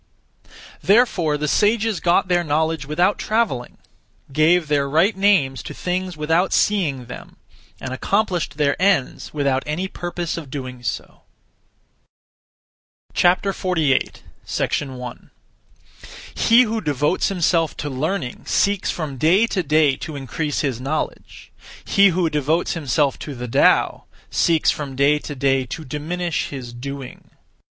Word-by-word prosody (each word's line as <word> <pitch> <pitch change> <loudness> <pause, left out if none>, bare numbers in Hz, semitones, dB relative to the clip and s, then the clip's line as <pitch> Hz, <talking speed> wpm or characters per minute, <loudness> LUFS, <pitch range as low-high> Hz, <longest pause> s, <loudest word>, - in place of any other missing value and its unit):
Therefore 195 -9 +3
the 150 +1 -2
sages 215 +4 +2
got 175 +1 +2
their 175 -1 +2
knowledge 160 -1 -1
without 175 +7 +1
travelling; 215 - -1 0.6
gave 160 +3 +3
their 140 -2 +1
(right) 170 +9 +3
names 190 -10 +2
to - - -8
things 180 -1 -3
without 160 +5 +1
seeing 155 -12 +1
them; 125 - -11 0.4
and 130 - -5
accomplished 175 -1 -1
their 145 -2 +2
ends 190 -9 +1
without 140 -3 0
any 165 +5 -2
purpose 175 -2 -4
of 155 -5 -7
doing 130 -2 -6
so. 115 -3 -5 1.9
48. 180 -5 +1 0.6
1. 125 -4 -8 1.0
He 235 +2 +5
who 225 -1 -2
devotes 150 +2 0
himself 170 -4 +1
to 150 - -4
learning 140 0 -3
(seeks) 200 -1 +1
from 150 -5 -4
day 175 - +4
to 200 -4 -1
day 155 -3 +3
to 155 - -7
increase 145 +2 -3
(his 130 -5 -2
knowledge); 140 +4 -5 0.3
he 200 0 +5
who 180 -2 +1
devotes 155 +2 0
himself 145 -3 0
to 145 - -7
the 125 0 -6
Tao 115 - +3 0.3
(seeks) 165 -2 +3
from 140 -3 -5
day 140 +2 +3
to 145 - -7
day 135 -1 +1
to 160 +6 -7
diminish 160 +5 -3
(his 125 -4 -7
doing). 135 +1 -8
155 Hz, 130 wpm, -21 LUFS, 140-180 Hz, 1.9 s, He